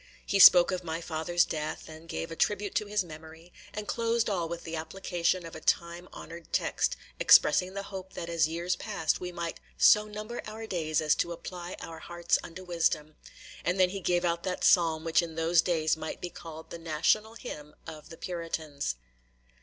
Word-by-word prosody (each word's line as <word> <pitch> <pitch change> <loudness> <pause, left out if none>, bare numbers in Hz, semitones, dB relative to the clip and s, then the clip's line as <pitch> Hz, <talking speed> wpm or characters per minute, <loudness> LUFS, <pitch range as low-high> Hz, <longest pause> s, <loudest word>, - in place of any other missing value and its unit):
He 200 - +1
spoke 180 -1 +9
of 185 -1 -2
my 165 -1 -3
father's 165 +1 +1
death, 155 -1 -4
and 160 +1 -12
gave 165 - -4
a - - -5
tribute 205 +3 0
to 210 - 0
his 205 -1 0
memory; 160 +1 -12 0.2
and 210 0 -6
closed 230 -1 +1
all 175 -4 -1
with 170 0 -5
the 165 0 -5
application 175 +1 -1
of 165 - -9
a - - -6
time 170 +1 0
honored 170 0 -10
text, - - 0 0.2
expressing 180 +5 +5
the 200 - -3
hope 190 -1 -8
that 170 - -5
as 165 -3 +2
years 170 +2 -1
passed 200 -8 -1
by - - -8
we 180 - -4
might 170 -1 -5 0.2
"so 210 0 +6
number 215 +3 -6
our 220 +1 -7
days 160 -7 -1
as 155 -1 +3
to 170 - -1
apply 175 +1 -7
our 165 -1 -8
hearts 175 +1 0
unto 180 +3 -9
wisdom"; 160 -3 0 0.5
and 180 +2 0
then 185 -1 +5
he 195 - -4
gave 175 -1 +1
out 170 0 0
that 185 0 -3
psalm 165 -3 +4
which 165 +1 +3
in 165 -2 -6
those 165 +1 +4
days 160 -3 +1
might 160 0 -6
be 175 - -5
called 160 -1 -10
the 170 - -6
national 170 +8 +1
hymn 150 -11 -8
of 155 -1 -10
the 165 - -10
Puritans. 160 - -4
170 Hz, 200 wpm, -29 LUFS, 160-185 Hz, 0.5 s, spoke